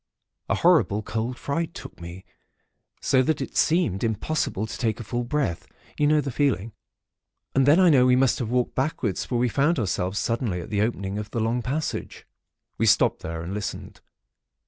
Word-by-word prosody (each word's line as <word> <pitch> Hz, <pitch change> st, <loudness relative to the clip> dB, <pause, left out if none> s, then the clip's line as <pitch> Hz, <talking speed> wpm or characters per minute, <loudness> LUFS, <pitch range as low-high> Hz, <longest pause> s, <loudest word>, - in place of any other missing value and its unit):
A -, -, +2 dB
horrible 105 Hz, +2 st, +3 dB
cold 115 Hz, +4 st, -3 dB
fright 165 Hz, +6 st, -3 dB
took 90 Hz, -, -10 dB
me, 85 Hz, +2 st, -9 dB, 0.8 s
so 130 Hz, -, +3 dB
that 155 Hz, +3 st, 0 dB
it -, -, -5 dB
seemed 155 Hz, -, +2 dB
impossible 110 Hz, -1 st, -1 dB
to 110 Hz, -, -7 dB
take 110 Hz, -3 st, -1 dB
a -, -, -5 dB
full 120 Hz, +3 st, -3 dB
breath, 130 Hz, -, -2 dB, 0.3 s
you 145 Hz, -, +2 dB
know 150 Hz, 0 st, +4 dB
the 140 Hz, -1 st, -4 dB
feeling; 115 Hz, -6 st, 0 dB, 0.8 s
and 135 Hz, 0 st, +3 dB
then 150 Hz, +5 st, +6 dB
I 180 Hz, -3 st, +6 dB
know 130 Hz, -3 st, +5 dB
we 125 Hz, -, +5 dB
must 130 Hz, -1 st, +2 dB
have 115 Hz, -, -2 dB
walked 125 Hz, 0 st, 0 dB
backwards, 130 Hz, -, -1 dB
for 125 Hz, -, -2 dB
we 125 Hz, +1 st, +2 dB
found 145 Hz, +8 st, +1 dB
ourselves 95 Hz, -3 st, -1 dB
suddenly 115 Hz, -5 st, -1 dB
at 85 Hz, -, -8 dB
the 105 Hz, -1 st, +1 dB
opening 105 Hz, -3 st, -2 dB
of 105 Hz, -1 st, -6 dB
the 115 Hz, -, -3 dB
long 115 Hz, +2 st, 0 dB
passage. 145 Hz, +6 st, -4 dB, 0.5 s
"We -, -, +2 dB
stopped -, -, +3 dB
there, 80 Hz, 0 st, -5 dB
and 90 Hz, +3 st, -5 dB
listened. 105 Hz, -1 st, -6 dB
120 Hz, 190 wpm, -25 LUFS, 105-140 Hz, 0.8 s, then